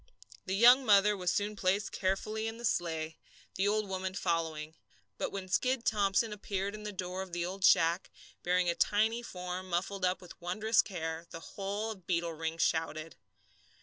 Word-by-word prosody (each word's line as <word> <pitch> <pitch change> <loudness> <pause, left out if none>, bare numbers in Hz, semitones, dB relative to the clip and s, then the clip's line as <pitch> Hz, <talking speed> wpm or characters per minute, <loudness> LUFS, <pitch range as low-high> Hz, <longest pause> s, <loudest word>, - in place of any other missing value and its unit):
The 190 - 0
young 245 +5 +7
mother 210 -2 +5
was 180 -3 0
soon 210 +1 -1
placed 195 +1 0
carefully 215 +3 -1
in 225 0 -5
the 240 - -5
sleigh, 160 -5 -1 0.3
the 195 +2 +1
old 215 0 +1
woman 190 0 -3
following. 160 -4 -1 0.5
But - - -2
when 195 -1 -5
Skid 250 +6 +1
Thomson 210 +1 +2
appeared 200 -1 -3
in 215 - -7
the 210 0 -5
door 185 -1 -4
of 190 -2 -8
the 175 0 -1
old 190 +2 -5
shack, 170 -1 +4 0.3
bearing 180 0 +2
a 170 - +3
tiny 220 +6 +2
form 180 -3 -6
muffled 185 +2 -2
up 185 0 +2
with 180 - -13
wondrous 215 +6 +2
care, 165 -3 -5
the 165 - -8
whole 205 +3 -3
of 190 -5 -11
Beetle 170 -2 0
Ring 160 +1 -3
shouted. 160 -1 -1
190 Hz, 180 wpm, -32 LUFS, 175-210 Hz, 0.5 s, young